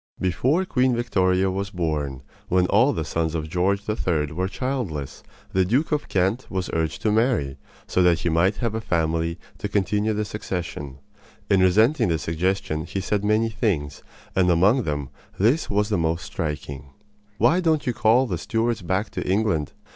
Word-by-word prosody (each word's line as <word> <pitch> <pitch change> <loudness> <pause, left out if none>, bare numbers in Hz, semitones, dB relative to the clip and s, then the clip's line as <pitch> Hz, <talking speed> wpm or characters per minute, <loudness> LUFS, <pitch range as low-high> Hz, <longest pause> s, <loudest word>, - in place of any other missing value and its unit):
Before 130 - +1
Queen 130 -6 +2
Victoria 95 -5 +1
was 100 +1 -3
born, 75 -8 -2 0.3
when 90 0 +3
all 115 +9 +4
the 80 - -3
sons 80 +1 -1
of 80 -1 -2
George 95 +4 +1
III. 85 -8 0
were 90 +4 -1
childless, 100 - -4 0.3
the 95 - +3
Duke 125 - +1
of 150 -1 0
Kent 95 +7 0
was 95 -2 -3
urged 80 -1 -2
to 110 - +2
marry, 105 - +1 0.3
so 90 - +1
that 85 -2 +4
he 85 - 0
might 85 +5 +2
have 115 -1 -2
a 110 - -2
family 85 -2 0 0.2
to 105 - -3
continue 105 +2 +1
the 105 0 -1
succession. 85 -9 -5 0.5
In 100 - +5
resenting 110 +8 +4
the 80 -2 +1
suggestion 80 0 -1
he 100 - -3
said 100 +1 -1
many 110 +2 +2
things, 90 - -1 0.3
and 90 -1 +3
among 100 +9 +4
them 75 -3 -3 0.3
this 120 - +2
was 105 +1 +1
the 105 -4 +1
most 80 0 -1
striking: 70 -1 -4 0.5
"Why 120 - +4
don't 160 -4 +1
you 125 - 0
call 115 +4 +4
the 90 -9 -3
Stuarts 115 +2 -1
back 95 +4 -1
to - - -4
England? 95 -7 +1
95 Hz, 175 wpm, -24 LUFS, 80-110 Hz, 0.5 s, In